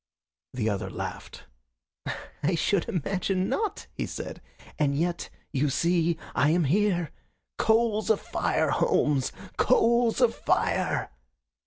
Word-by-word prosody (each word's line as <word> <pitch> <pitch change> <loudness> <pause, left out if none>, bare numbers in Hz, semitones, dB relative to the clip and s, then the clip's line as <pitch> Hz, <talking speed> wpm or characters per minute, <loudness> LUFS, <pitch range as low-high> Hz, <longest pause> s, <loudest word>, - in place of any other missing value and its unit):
The 115 -4 -1
other 100 -3 -1
laughed. - - -7 1.0
"I 170 +4 +1
should 195 +5 +1
imagine 190 0 -1
not," 430 -2 -2
he - - -3
said. - - -6 0.4
"And 140 -2 +2
yet, 170 +2 -1 0.2
you 140 +2 +1
see, 170 +4 +1 0.2
I 145 - +3
am 170 +2 +3
here. 175 +2 +1 0.5
Coals 220 -1 +2
of 220 - +4
fire, - - 0
Holmes 150 - +2 0.3
coals 235 -1 +3
of 245 -3 +4
fire!" - - 0
180 Hz, 120 wpm, -27 LUFS, 150-220 Hz, 1.0 s, of